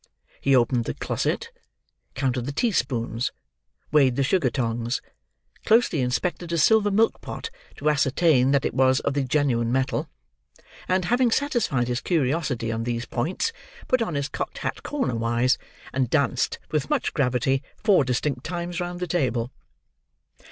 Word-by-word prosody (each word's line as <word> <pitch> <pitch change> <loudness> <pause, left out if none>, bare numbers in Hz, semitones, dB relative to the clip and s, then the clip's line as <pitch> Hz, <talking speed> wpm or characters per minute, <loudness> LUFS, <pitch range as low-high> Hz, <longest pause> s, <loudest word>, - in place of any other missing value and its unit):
He 135 -1 +4
opened 120 -1 +2
the - - -3
closet, - - -2 0.6
counted 130 -2 -1
the - - -2
teaspoons, 125 - 0 0.6
weighed 135 -4 +4
the 140 - +1
sugar 145 -1 +2
tongs, 120 0 -1 0.6
closely 220 - +3
inspected 170 +7 -1
a 170 - 0
silver 210 +6 +4
milk 220 +3 +2
pot - - -6 0.3
to 150 - -3
ascertain 140 -1 +3
that 140 -1 +2
it - - -1
was 130 0 +3
of 140 - -1
the 140 - +1
genuine 125 -4 +1
metal, 130 +1 0 0.8
and, 185 -1 +1
having 245 +4 +3
satisfied 230 - +1
his 125 0 -1
curiosity 140 -7 0
on 115 0 -2
these 120 0 -2
points, 180 - -2 0.3
put 255 -1 +2
on 175 -9 -1
his 140 -1 -1
cocked - - -5
hat - - -3
corner 280 - -2
wise, 115 +2 +1 0.3
and 130 -2 0
danced 140 -3 +1
with 150 -2 -1
much - - 0
gravity 135 0 +1 0.2
four 205 -8 +4
distinct 125 +1 -1
times 175 0 -4
round 175 0 -4
the - - 0
table. 125 -8 0
135 Hz, 150 wpm, -25 LUFS, 125-175 Hz, 0.8 s, He